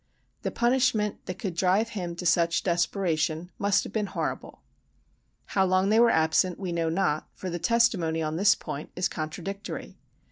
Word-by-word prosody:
The - - -2
punishment 240 -4 +1
that 185 - -4
could 190 -2 -4
drive 190 +6 +2
him 180 -6 -4
to 180 - -6
such 170 0 +2
desperation 170 -2 0
must 200 0 +2
have - - -9
been 210 -2 0
horrible. - - -5 0.9
How 190 - +4
long 185 +1 +2
they 220 +2 +4
were 235 0 +6
absent 160 +2 +2
we 185 -3 -3
know 165 -1 0
not, 160 -3 0
for 185 - -5
the 175 - -3
testimony 175 -5 +2
on 155 0 -2
this 200 +4 +5
point 145 - -7
is 180 - +1
contradictory. 175 +6 -6
185 Hz, 170 wpm, -27 LUFS, 165-200 Hz, 0.9 s, were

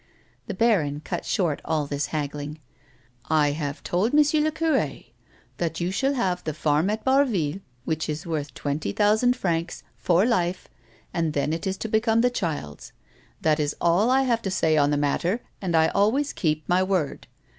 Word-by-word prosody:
The 210 - -4
baron 170 -10 +2
cut 175 +1 -4
short 170 -7 0
all 155 -2 0
this 145 +1 -2
haggling. 150 0 -4 0.4
" 120 0 -31 0.2
I 145 - +2
have 145 -2 -4
told 205 +10 0
M. 300 0 +4
le 310 - +1
cure 310 - 0 0.6
that 165 -2 -2
you 175 +1 -1
shall 270 +8 0
have 185 -7 -1
the 155 -2 -4
farm 155 +4 +1
at 215 +1 -2
Barville, 225 - +2 0.3
which 160 -1 -2
is 150 0 -4
worth 155 -4 -3
twenty 145 -7 -3
thousand 220 +4 +3
francs, 170 -6 -2
for 180 +3 +3
life, 180 -6 0 0.5
and 165 -3 0
then 145 +1 0
it 165 +3 -3
is 190 0 -2
to 225 - -4
become 225 +1 +2
the 245 +1 +3
child's. 155 - -4 0.5
That 155 -1 +2
is 145 -1 -1
all 175 +7 +3
I 265 +1 +4
have 235 -3 +1
to 195 - -3
say 160 -4 +2
on 145 -1 +3
the 145 - +1
matter, 170 +9 0 0.2
and 180 -4 -1
I 160 0 +4
always 235 +9 +1
keep' 155 -2 -1
my 180 +1 +3
word. 185 -6 -1
170 Hz, 185 wpm, -25 LUFS, 150-220 Hz, 0.6 s, M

